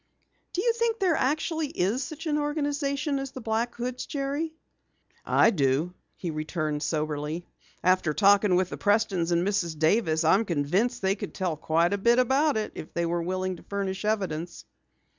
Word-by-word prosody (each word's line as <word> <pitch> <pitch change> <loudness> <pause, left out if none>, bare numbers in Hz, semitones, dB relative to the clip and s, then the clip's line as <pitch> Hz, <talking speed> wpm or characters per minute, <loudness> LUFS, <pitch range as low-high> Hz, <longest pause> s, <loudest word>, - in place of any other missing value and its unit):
"Do 365 - -1
you 470 -1 +3
think 465 -1 0
there 375 -5 +2
actually 310 +3 0
is 225 +2 0
such 320 +1 -7
an 300 -1 +1
organization 290 -1 -1
as 270 0 -5
the - - -6
Black 230 +1 -1
Hoods, 250 +1 -4
Jerry?" 285 +3 -2 0.7
"I - - +4
do," 150 - +1 0.2
he 175 - -4
returned 155 -1 -2
soberly. 155 +2 -2 0.4
"After 185 -3 +3
talking 200 +2 +4
with 185 0 +1
the - - -5
Prestons 200 -5 +1
and 170 +2 +2
Mrs. 175 -6 -1
Davis, 160 0 +2
I'm 190 +7 +4
convinced 180 +6 0
they 190 0 +3
could 200 - -7
tell 180 -4 -1
quite 165 +4 +1
a 200 - -1
bit 235 +4 +4
about 270 +3 +3
it 215 - -2
if 155 - -9
they 170 - +1
were 170 0 -1
willing 185 +1 -2
to - - -15
furnish 195 -1 -3
evidence." 180 -6 -2
200 Hz, 175 wpm, -27 LUFS, 170-270 Hz, 0.7 s, I